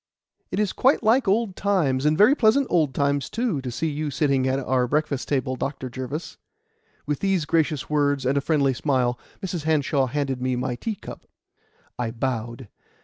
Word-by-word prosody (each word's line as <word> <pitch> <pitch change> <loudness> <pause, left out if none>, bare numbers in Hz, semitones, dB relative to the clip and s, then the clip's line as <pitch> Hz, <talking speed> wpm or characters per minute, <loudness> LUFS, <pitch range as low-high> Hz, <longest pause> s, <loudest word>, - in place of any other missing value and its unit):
"It - - -2
is 210 -3 0
quite 265 +3 +3
like 230 +2 +3
old 205 -1 +1
times 150 -9 +1
and 155 +1 +2
very 215 +8 +6
pleasant 270 +1 +3
old 155 -7 +2
times, 140 -1 0
too 225 - -1
to 130 - -5
see 125 +7 -2
you 150 0 -2
sitting 135 -1 +1
at 130 +1 +1
our 130 -2 0
breakfast 145 -1 -1
table, 130 -2 -1
Dr. 130 -1 -4
Jervis." 130 +6 -6 0.7
With 145 -1 -2
these 195 -5 +1
gracious 155 -3 0
words 145 -3 +1
and 135 +2 +2
a 140 - +2
friendly 140 -2 +2
smile, 125 -3 0 0.2
Mrs. 175 -5 -4
Hanshaw 145 -3 +2
handed 135 -1 -2
me 130 0 0
my 125 0 -2
tea 215 - -4
cup. - - -11 0.7
I 120 -2 -1
bowed. 120 0 -4
145 Hz, 180 wpm, -24 LUFS, 130-165 Hz, 0.7 s, very